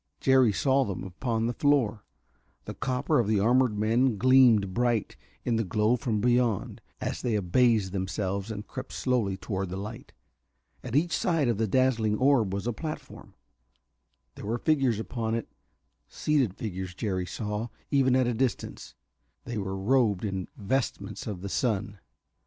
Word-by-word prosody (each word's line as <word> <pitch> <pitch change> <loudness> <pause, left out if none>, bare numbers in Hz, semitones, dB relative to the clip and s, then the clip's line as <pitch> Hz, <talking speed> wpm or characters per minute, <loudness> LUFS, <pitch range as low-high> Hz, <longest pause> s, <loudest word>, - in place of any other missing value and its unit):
Jerry 130 -4 +4
saw 135 +6 +2
them 100 -7 -4
upon 110 +5 -2
the 120 - -1
floor. 120 -8 +1 0.6
The - - -6
copper 130 +3 0
of 115 - +1
the 105 -1 +2
armored 120 +1 +3
men 115 +2 +2
gleamed 120 -5 +5
bright 120 -2 0 0.3
in 115 -2 +1
the 115 - +1
glow 105 +5 +2
from 120 -4 -1
beyond, 120 -2 +1 0.2
as - - -3
they 120 -3 0
abased 105 +1 +2
themselves 95 +1 -2
and 105 -1 -5
crept - - -8
slowly 115 -7 0
toward 95 -2 -3
the 95 - -5
light. 105 +4 -7 0.7
At 125 -1 -5
each 165 +3 +2
side 165 -7 +1
of 115 -3 0
the 110 - +1
dazzling 115 -2 +2
orb 130 -6 +3
was 100 +2 -3
a 120 - -1
platform. 155 +7 -8 1.0
There 100 - -9
were 115 +2 0
figures 135 -7 +1
upon 115 0 -2
it, 115 - -5 0.6
seated 135 -11 0
figures, 95 -4 -5
Jerry 95 -4 -2
saw, 105 +3 -3 0.2
even 135 -3 +3
at 130 -1 +3
a 120 - 0
distance, 125 -1 -3 0.5
that 120 -3 -4
were 95 -1 -3
robed 105 -2 +2
in 95 -3 -3
vestments 120 +6 -2
of 100 -5 -5
the 100 - -5
sun. 105 -2 -1
115 Hz, 160 wpm, -28 LUFS, 100-125 Hz, 1.0 s, gleamed